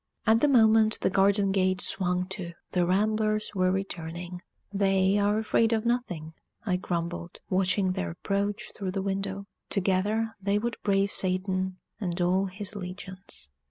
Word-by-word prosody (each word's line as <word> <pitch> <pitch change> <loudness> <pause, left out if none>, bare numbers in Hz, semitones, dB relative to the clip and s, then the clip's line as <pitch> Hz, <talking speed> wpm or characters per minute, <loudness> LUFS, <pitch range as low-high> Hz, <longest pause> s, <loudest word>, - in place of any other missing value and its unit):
At 220 +1 +4
that 295 - +4
moment 220 -3 +5
the - - +2
garden 195 +1 +3
gate 185 -1 +2
swung 180 -1 +1
to; 185 -3 -4 0.2
the 180 -1 +1
ramblers 215 +2 +1
were 185 -2 +2
returning. 175 -2 -4 0.3
"They 195 0 +3
are 205 +1 +2
afraid 220 +1 +2
of 220 0 0
nothing," 180 -10 -2 0.3
I 185 -4 +1
grumbled, 170 -1 -4
watching 185 0 +2
their 90 - -2
approach 200 - -2
through 190 -2 -4
the 195 -1 -2
window. 195 0 -3 0.2
"Together 205 +4 +1
they 200 +1 +1
would 235 +2 -2
brave 200 0 +2
Satan 185 0 +1 0.2
and 180 -4 -3
all 185 +2 +2
his 200 +2 -5
legions." 185 - -4
195 Hz, 150 wpm, -28 LUFS, 185-205 Hz, 0.3 s, moment